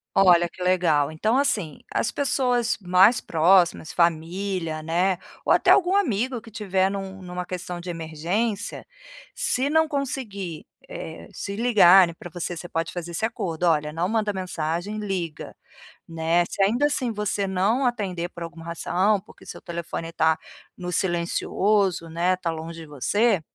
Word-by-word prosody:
Olha 175 -3 +5
que 180 - -18
legal 165 -5 +2
então 220 +10 +1
assim, 210 - 0 0.2
as - - +1
pessoas 250 -4 +1
mais 190 +5 +5
próximas, 170 0 +3
família, 170 0 -1
né, 175 +3 +1 0.3
ou - - +4
até - - +4
algum 370 0 +5
amigo 255 - +1
que 225 - -13
estiver 195 -3 0
em 200 - -2
uma 190 -1 -7
em 180 - -9
uma 180 - -5
questão 180 -1 -5
de 175 - -9
emergência, 175 +7 -3 0.5
se 265 +3 0
não 320 +1 +4
conseguir, 220 - -4 0.2
eh, - - -8
se 200 - -5
ligarem 195 -6 +6
para 175 - -10
você, 175 +1 -5
você 175 +1 -7
pode 165 0 -2
fazer 175 -1 -6
esse 220 - -2
acordo, 180 -7 -3
"Olha, 150 -2 +2
não 170 +4 -1
manda 215 -1 0
mensagem 185 +2 -3
liga", 185 -6 -4 0.5
né, 165 +1 +1
se - - -3
ainda 235 +9 +2
assim 265 -5 0
você 210 -2 -1
não 200 +8 +1
atender 185 -7 -2
por 170 - -8
alguma 165 0 -9
razão 180 +5 +1
porque 195 - -18
seu - - -8
telefone 170 -1 -5
está 160 -1 +2 0.4
no 180 0 -5
silencioso, 180 +1 0
né, 175 +3 +1
está 175 -2 -3
longe 165 +1 -7
de 160 - -9
você 195 - +1
185 Hz, 160 wpm, -24 LUFS, 170-215 Hz, 0.5 s, ligarem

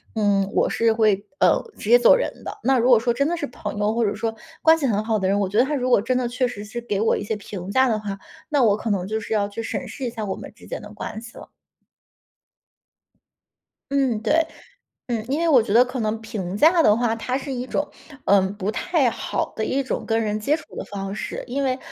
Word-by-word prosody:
嗯， 200 -2 +2
我 - - +2
是 230 0 +2
会， 215 -3 +2
呃， - - +5 0.2
直 210 - -6
接 240 - +9
走 245 - +6
人 - - -1
的。 - - -6
那 265 +1 +3
如 245 +1 +3
果 240 -3 +7
说 240 +1 +1
真 280 +4 +1
的 345 +3 0
是 295 -3 -3
朋 210 -4 -6
友， 210 +1 +1
或 235 - +2
者 200 - 0
说 225 -1 -3 0.3
关 320 0 +6
系 305 - -1
很 210 -5 +1
好 220 -1 +1
的 190 -2 0
人， 200 +1 +2
我 200 - +1
觉 205 +3 -3
得 240 - +6
他 285 +3 -2
如 255 -2 -1
果 240 - +5
真 250 +4 0
的 250 -1 0
确 250 +2 0
实 210 -4 -5
是 240 +3 -6
给 210 -4 -2
我 220 - +3
一 - - -3
些 210 +1 -2
评 195 -2 -7
价 260 +4 +4
的 225 -3 +1
话， 200 -2 -5 0.3
那 290 -3 +2
我 210 -3 +4
可 220 +2 -4
能 190 -3 0
就 215 +2 -1
是 220 - -4
要 205 -2 +1
去 205 +3 -6
审 250 - -4
视 240 +5 -8
一 245 - -1
下 225 -2 -5
我 195 - -3
们 - - -9
之 - - -16
间 - - -5
的 - - -11
关 220 - -6
系 225 -1 -12
了。 - - -11 2.4
嗯， 265 -5 +1
对。 315 +8 +2 0.6
嗯， 235 -3 -2
因 290 - +1
为 335 - +1
我 275 -7 +6
觉 215 - -4
得 240 +4 +6
可 250 +1 -5
能 220 0 -1
评 205 -5 -4
价 330 +7 +5
的 210 -9 +5
话， 235 -1 +1
它 250 +3 -2
是 275 0 -6
一 250 0 -3
种， 290 - -1 0.4
嗯， 195 0 +3
不 205 +1 -2
太 300 +4 +1
好 235 - -2
的 220 - -2
一 270 +5 0
种 260 - -3
跟 225 0 +1
人 210 0 -1
接 280 +8 +2
触 - - -12
的 - - -4
方 195 -1 -5
式。 210 - -5
因 275 +3 -2
为 255 -1 0
225 Hz, 275 characters per minute, -23 LUFS, 210-255 Hz, 2.4 s, 接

